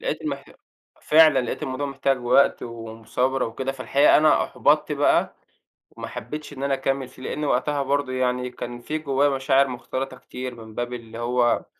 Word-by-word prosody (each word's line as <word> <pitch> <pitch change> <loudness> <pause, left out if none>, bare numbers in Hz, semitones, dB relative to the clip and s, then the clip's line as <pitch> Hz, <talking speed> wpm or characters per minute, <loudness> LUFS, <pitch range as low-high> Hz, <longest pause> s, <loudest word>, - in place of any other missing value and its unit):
لقيت - - -3
المح - - -4 0.6
فعلاً 155 -2 +6
لقيت 125 - -4
الموضوع 130 +2 -3
محتاج 135 -1 0
وقت 125 +3 +4
ومثابرة 115 +3 -2
وكده، 130 +4 -4
فالحقيقة 135 +2 +4
أنا 155 0 +4
أُحبطت - - +1
بقى - - +2 0.6
وما - - -8
حبيتش 150 +6 -7
إن 135 - -6
أنا 140 0 +1
أكمِّل 135 0 -1
فيه، 130 - -16
لأن 150 - -4
وقتها 140 +2 +1
برضه 140 -1 0
يعني 125 0 0
كان 120 -1 -7
في 155 +5 -3
جوايّا 140 -1 +2
مشاعر 135 0 +2
مختلطة 130 +1 -5
كتير 125 0 -7
من 110 -2 -12
باب 120 0 -3
اللي 115 -1 -8
هو 120 0 +1
130 Hz, 170 wpm, -24 LUFS, 125-140 Hz, 0.6 s, فعلاً